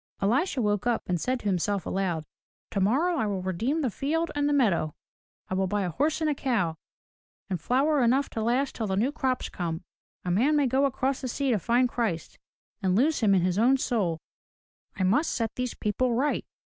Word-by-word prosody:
Elisha 250 - +1
woke 210 +1 0
up 240 -2 0
and 175 -3 -1
said 255 0 0
to - - -15
himself 195 0 0
aloud, 180 -5 -1 0.5
"Tomorrow 265 - +2
I 220 - 0
will 195 -3 -2
redeem 230 - -1
the 260 -6 0
field 320 +8 -1
and 290 0 +1
the - - +1
meadow. 195 - +2 0.5
I - - -4
will 190 0 +1
buy 205 +1 0
a 180 - -2
horse 300 - 0
and 315 - +2
a - - +2
cow, 225 - 0 0.8
and 180 -4 -2
flour 275 - +2
enough 260 +4 +3
to 225 - -3
last 250 +5 +1
till 220 - -3
the 190 - 0
new 240 +7 +2
crop 260 -3 -1
comes. 170 -2 -3 0.4
A 180 - 0
man 255 +12 +3
may 290 -1 +3
go 265 +2 +2
across 265 0 -1
the 260 - -3
sea 270 +2 -1
to 220 - +2
find 240 +6 +2
Christ, 220 -10 -3 0.4
and 185 -2 +1
lose 285 +8 +3
him 205 -4 +4
in 180 - +3
his 185 +2 +1
own 255 +4 +5
soul. 205 -11 0 0.8
I 190 - -1
must 230 - +2
set 225 -2 -1
these 250 -1 -3
people 235 +3 0
right. 280 +5 0
235 Hz, 205 wpm, -27 LUFS, 190-270 Hz, 0.8 s, own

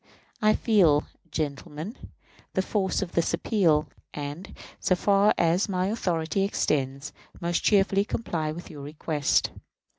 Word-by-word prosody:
I 215 0 +4
feel, 175 -10 +4 0.3
gentlemen, 150 - -4 0.6
the 190 - +2
force 195 -1 0
of 175 - -7
this 170 - +1
appeal, 165 -8 +2 0.3
and, 150 +6 -6 0.2
so 185 - +2
far 200 +3 +4
as 175 +5 +2
my 185 0 0
authority 175 -4 -1
extends, 140 -7 -1 0.3
most 170 0 0
cheerfully 195 -1 +4
comply 165 -9 -2
with 170 +3 -8
your 145 -2 -9
request. 150 0 0
170 Hz, 125 wpm, -26 LUFS, 150-195 Hz, 0.6 s, I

